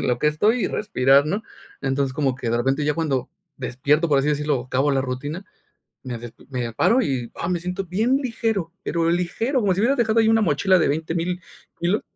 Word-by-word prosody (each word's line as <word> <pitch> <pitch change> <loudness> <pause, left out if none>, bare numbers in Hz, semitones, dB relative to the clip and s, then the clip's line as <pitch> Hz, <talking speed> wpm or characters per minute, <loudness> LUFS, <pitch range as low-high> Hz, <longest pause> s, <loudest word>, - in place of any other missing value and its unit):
En - - -1
lo 125 -1 +1
que 150 - +3
estoy 210 +11 +2
y - - 0
respirar, 140 -8 +3
¿no?, 200 +7 -1 0.4
entonces, 135 -1 0
como 135 -3 +1
que 120 - -4
de 120 - +1
repente 135 +5 0
ya 150 0 +1
cuando 150 -6 -1 0.3
despierto, 140 +6 +1
por 145 -2 +4
así 140 - -1
decirlo, 150 -3 0
o 125 - -10
acabo 135 +3 +1
la 135 - +2
rutina, 145 +8 -4 0.6
me 125 -2 -5
despi 115 0 -12
me 125 -3 -3
paro 250 - +3
y, 130 - -2
ah, 170 - -3
me 180 - 0
siento 180 +2 -3
bien 225 +9 +1
ligero, 225 -8 -2
pero 165 0 +1
ligero. 225 +10 0
Como 195 -4 +2
si 195 - -1
hubieras 255 +5 +2
dejado 225 -1 +3
ahí 220 - +3
una 225 0 +4
mochila 185 +2 +3
de 160 - +2
20000 165 +4 -2 0.4
kilos. 180 +5 +1
155 Hz, 215 wpm, -23 LUFS, 135-195 Hz, 0.6 s, por